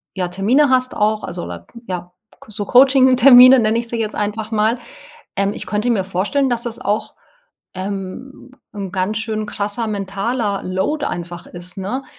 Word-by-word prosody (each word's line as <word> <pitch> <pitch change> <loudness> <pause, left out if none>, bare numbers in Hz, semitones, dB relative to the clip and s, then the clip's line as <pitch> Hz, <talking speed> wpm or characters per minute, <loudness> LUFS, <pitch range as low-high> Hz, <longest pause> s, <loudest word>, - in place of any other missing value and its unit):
ja, 185 -2 -1
Termine 220 +11 +2
hast 255 -1 +1
auch 215 +1 0
also, 175 0 -6
oder, - - -8 0.2
ja, 180 -1 -5 0.4
so 210 -1 -5
Coaching-Termine 260 0 +7
nenne 220 0 +1
ich 235 0 -2
sie 235 - -4
jetzt 215 -1 -3
einfach 210 +1 -3
mal 220 +2 +1 0.6
ähm, 200 0 0
ich - - -5
könnte 210 +3 -1
mir 215 -5 +1
vorstellen 200 +9 0
dass 240 -1 -1
das 235 -1 -5
auch, 215 -4 -2 0.6
ähm, 195 +8 -7 0.2
'n 195 -3 -6
ganz 195 +4 -1
schön 215 -1 -3
krasser 210 +3 -3
mentaler 200 +1 -2
Load 190 +12 -2
einfach 175 0 -6
ist, 175 0 -10
ne? 205 +8 -4
215 Hz, 160 wpm, -19 LUFS, 195-245 Hz, 0.6 s, Coaching-Termine